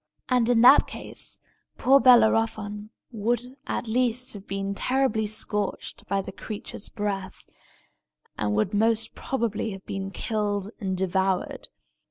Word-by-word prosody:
And 245 -2 +3
in 235 -2 +4
that 255 +4 +8
case - - -3 0.4
poor 270 +2 +5
Bellerophon 220 -4 +3 0.2
would 240 +3 -2
at - - -3
least 250 +1 +1
have 200 -2 -10
been 195 0 -3
terribly 250 -1 +1
scorched 210 -1 -3
by 195 +1 0
the 195 - -7
creature's 205 +1 -5
breath, 200 -3 -4 0.9
and 105 -1 -1
would 110 - 0
most 225 +2 +1
probably 230 -4 -2
have 195 0 -11
been 195 0 -4
killed 205 -1 -2
and 190 -3 -2
devoured. 190 0 -1
215 Hz, 130 wpm, -26 LUFS, 195-235 Hz, 0.9 s, that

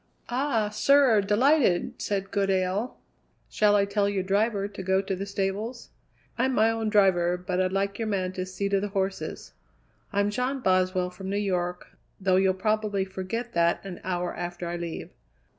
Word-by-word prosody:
"Ah, 240 -4 0
sir, 255 0 +4
delighted," 210 - +2
said 195 -1 -2
Goodale. 195 +3 0 0.5
"Shall 210 -1 +3
I 200 -1 +4
tell 200 0 +1
your 195 -2 -1
driver 200 +1 +1
to 200 -1 -8
go 190 0 +2
to 195 0 -2
the 195 +2 -5
stables?" 200 +5 -3 0.5
"I'm 260 +1 +2
my 220 +1 +4
own 225 -1 -1
driver, 180 -4 +3
but 180 0 -2
I'd 185 0 0
like 200 +1 -1
your 225 - -1
man 190 -3 -1
to 185 0 -4
see 195 +2 -3
to 200 0 +2
the 205 - -2
horses. 195 -1 -3 0.6
I'm 200 0 +1
John 255 +4 -1
Boswell 185 -3 +1
from 190 +1 -7
New 200 - -1
York, 180 -3 -1 0.3
though 190 -1 +2
you'll 190 0 +3
probably 210 -1 0
forget 195 +6 -5
that 170 +2 +1
an 185 -2 -7
hour 180 -1 -2
after 175 0 -5
I 170 - -3
leave." 170 -1 -6
195 Hz, 175 wpm, -27 LUFS, 185-210 Hz, 0.6 s, sir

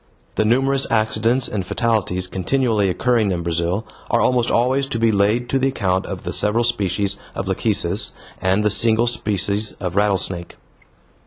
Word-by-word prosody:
The 110 - 0
numerous 135 +4 +2
accidents 115 +3 +1
and 105 -3 -3
fatalities 95 -3 -1
continually 105 +2 0
occurring 110 +2 +1
in 85 -2 -2
Brazil 85 +5 -1 0.2
are 120 - +2
almost 120 +1 +2
always 130 +3 +2
to 120 - -2
be 115 0 +3
laid 105 +4 +1
to 135 - +1
the 135 - +2
account 95 -8 -1
of - - -6
the - - -4
several 110 +3 +1
species 100 -4 -1 0.2
of 95 - -4
lachecis 95 -1 0 0.3
and 95 +2 +2
the 105 - +2
single 115 +2 +3
species 105 -2 -1
of 90 -2 -5
rattlesnake. 95 -4 0
105 Hz, 160 wpm, -20 LUFS, 95-120 Hz, 0.3 s, be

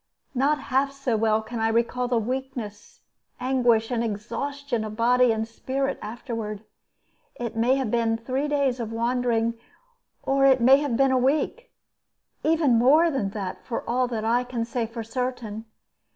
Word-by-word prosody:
Not 280 +3 +2
half 275 0 0
so 275 -4 -2
well 220 0 +2
can 225 +1 -6
I 225 - +2
recall 235 +2 0
the 245 -1 +1
weakness, 240 -3 -5 0.4
anguish, 245 -3 +2
and 235 -1 0
exhaustion 235 +4 -3
of 215 0 -6
body 245 +2 +4
and 220 0 -1
spirit 270 +4 -3
afterward. 220 -2 -5 0.7
It 235 -2 -5
may 235 +4 +3
have 265 -5 -1
been 230 -1 +1
three 260 +5 -2
days 280 -4 +1
of 225 -2 -4
wandering, 230 -1 0 0.6
or 275 0 +1
it 265 -1 +6
may 260 +3 +7
have 285 -5 -1
been 270 0 +4
a 260 - +3
week, 305 - 0 0.7
or - - +1
even 300 -8 +3
more 305 +7 +5
than 250 -9 -1
that, 190 -2 -5
for 235 - -5
all 250 +1 +1
that 225 -3 -3
I 240 +2 +2
can 245 -2 -3
say 235 -1 -2
for 230 0 -6
certain. 230 -2 -4
245 Hz, 165 wpm, -25 LUFS, 225-265 Hz, 0.7 s, may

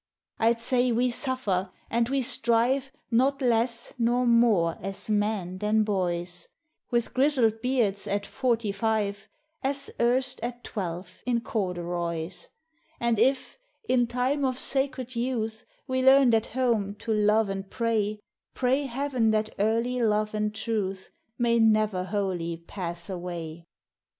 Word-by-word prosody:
I 225 0 +4
'd - - -11
say 245 +1 +2
we 245 +2 +2
suffer 235 -9 0 0.2
and 235 +1 +1
we 270 -1 +1
strive 245 +2 +1 0.2
Not 265 +4 +3
less 235 -2 +1
nor 240 +2 +2
more 230 -8 +4
as 195 +3 -3
men 205 -3 -1
than 215 +1 +2
boys, 175 -3 -2 0.2
— 305 - -53
With 235 -1 0
grizzled 255 -5 +2
beards 230 -6 0
at 200 0 -1
forty 235 -5 0
five, 205 -1 -1 0.3
As 275 0 -1
erst 250 +2 +2
at 240 +1 -5
twelve 180 -2 -5
in 240 -2 +1
corduroys; 175 -4 -3 0.5
And 235 -2 +1
if, 265 - +1 0.3
in 245 -2 +3
time 255 +4 0
of 255 -2 0
sacred 265 -2 -1
youth, 230 -3 -2 0.2
We 260 -1 -1
learned 265 -2 +6
at 225 -1 +2
home 230 -5 0
to 220 +1 -3
love 210 +1 +3
and 195 0 -5
pray, 215 -3 -1 0.3
Pray 265 +3 +1
Heaven 255 -2 0
that 215 0 0
early 230 +4 +1
love 215 -1 +1
and 210 0 0
truth 210 -4 -3 0.3
May 235 -1 +2
never 215 -4 +3
wholly 185 -4 -2
pass 170 0 -6
away. 170 -3 -6
225 Hz, 140 wpm, -27 LUFS, 200-250 Hz, 0.5 s, learned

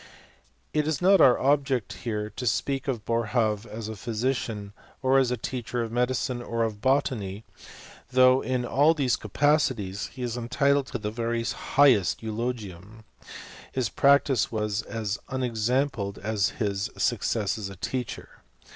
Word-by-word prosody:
It 150 0 +1
is 155 -3 0
not 190 0 +5
our 125 -2 +7
object 135 -3 +1
here 105 -2 -4
to 125 - -5
speak 135 +5 -1
of 120 -6 -2
Boerhaave 115 -2 0
as 110 0 -6
a 110 - -5
physician, 110 -2 -3 0.3
or 130 +1 +4
as 130 -2 +2
a 125 - -1
teacher 120 0 -3
of 115 - -5
medicine, 125 +1 0
or 115 -1 -1
of 105 -2 -3
botany; 115 -7 0 0.7
though 130 0 +5
in 130 -1 -1
all 145 +7 +3
these 135 -5 +1
capacities 115 -5 0
he 125 - -8
is 120 -1 -2
entitled 140 +3 +1
to 125 - -4
the 105 -2 -4
very 115 +1 -2
highest 120 -4 +3
eulogium; 110 -3 -5 0.7
his 125 -5 -1
practice 140 -1 +3
was 105 -1 -1
as 110 -1 -4
unexampled 120 -3 -1
as 105 -2 0
his 100 -3 -1
success 110 0 0
as 100 -2 -4
a 100 - -9
teacher. 125 +5 -5
120 Hz, 145 wpm, -26 LUFS, 105-130 Hz, 0.7 s, our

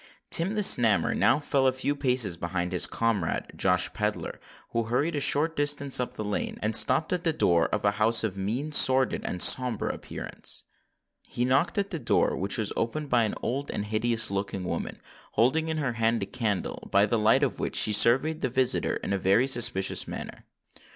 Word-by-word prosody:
Tim 185 +6 0
the 210 - 0
Snammer 110 - +4
now - - +3
fell 140 -2 0
a - - +3
few 130 +2 -3
paces 125 - 0
behind 85 +1 -4
his 90 - +2
comrade, 115 -7 -2
Josh 90 -1 +2
Pedler, 105 0 -4 0.3
who 115 -1 -2
hurried 140 +8 -1
a - - -1
short 155 +3 +1
distance 140 -2 0
up 125 - -4
the 110 - -5
lane, 105 - -4
and 110 +1 +2
stopped 135 +10 +3
at 180 -1 -3
the 165 - +1
door 85 - +1
of - - -3
a 100 - +3
house 110 +3 +2
of 105 -4 -3
mean, 115 +10 -4
sordid, 130 -3 +4
and 90 - +2
sombre 125 -4 +4
appearance. - - -7 0.6
He 120 - -3
knocked 135 - 0
at 200 0 -2
the 165 - -4
door, 120 - 0
which 100 +6 -1
was 110 -3 -3
opened 145 +6 -3
by 120 -2 +3
an 105 - -4
old 140 +4 -3
and 105 - -4
hideous 110 +1 0
looking 100 -1 -4
woman, 90 - -5 0.3
holding 130 +9 +1
in 160 -1 -3
her 140 -5 -2
hand 115 -1 0
a - - -3
candle, 105 -4 -4
by 100 +1 +4
the 110 +2 -1
light 110 +6 +3
of 135 - -2
which - - -4
she 105 - +4
surveyed 135 +9 +3
the 130 - -1
visitor 130 +1 0
in - - -3
a 100 - -1
very 100 +7 +2
suspicions 120 -7 0
manner. - - -9
120 Hz, 200 wpm, -26 LUFS, 105-140 Hz, 0.6 s, Snammer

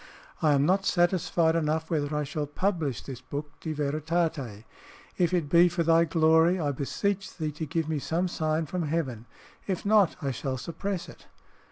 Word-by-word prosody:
I 155 -2 +4
am 140 0 +3
not 190 +4 +2
satisfied 175 -3 +2
enough 160 0 -1
whether 150 -2 0
I 150 - 0
shall 150 +1 -3
publish 160 - -1
this 130 -3 -8
book, 145 +3 -7
De 160 - -4
Veritate. 150 -5 -2 0.6
If 175 -1 +3
it 175 -5 0
be 170 +4 +6
for 170 0 -1
thy 165 +1 +4
glory, 160 +2 +4
I 145 -3 0
beseech 190 +8 -2
thee 155 -2 -2
to 155 +2 -5
give 160 +2 -1
me 155 -2 -1
some 170 +6 -1
sign 160 -2 -1
from 170 0 -3
heaven; 130 -8 -2 0.4
if 190 -1 -2
not, 205 -3 +4
I 140 -2 -2
shall 130 +1 -3
suppress 175 +7 -4
it! - - -14
160 Hz, 180 wpm, -28 LUFS, 145-175 Hz, 0.6 s, be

